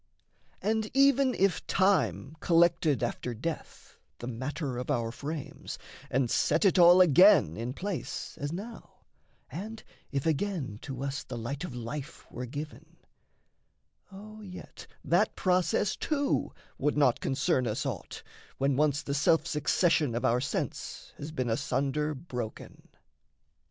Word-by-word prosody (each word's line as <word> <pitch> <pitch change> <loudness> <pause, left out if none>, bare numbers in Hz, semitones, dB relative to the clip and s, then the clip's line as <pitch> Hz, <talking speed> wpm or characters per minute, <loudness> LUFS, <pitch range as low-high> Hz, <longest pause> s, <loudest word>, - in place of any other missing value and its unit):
And, 220 0 0
even 275 -1 +4
if 195 -3 +1
time 150 - +2
collected 165 -6 +3
after 120 0 -3
death 160 +9 -6 0.2
The - - -7
matter 130 +2 -4
of 125 - -6
our 115 -5 0
frames 145 +3 -6 0.3
and 130 -2 +1
set - - +2
it 190 -1 +4
all 175 +1 +8
Again 180 - +6
in 120 +5 -4
place 180 - -4
as 145 +1 -2
now, 210 +7 -9 0.5
and 215 +5 -6 0.3
if 140 -1 -2
again 160 - -1
To 135 -1 -6
us 140 0 -3
the 125 - -7
light 135 +6 -4
of 150 -9 -6
life 135 +6 -6
were 125 0 -5
given, 150 +4 -8 1.1
O 215 +2 -11
yet 185 -3 -10 0.2
That 175 +6 +2
process 185 +2 +1
too 285 -2 0 0.3
would 150 0 +1
not 130 -5 +4
concern 135 -1 +1
us 105 0 -2
aught, - - -5 0.3
When 135 0 +1
once 150 +1 +2
the 140 - -3
self 155 +3 +3
succession 150 -2 +2
of 120 - -1
our 120 +2 +3
sense - - -4
Has 145 +2 -6
been 130 -5 -2
asunder 140 +6 0
broken. 125 -6 -7
150 Hz, 135 wpm, -29 LUFS, 130-180 Hz, 1.1 s, all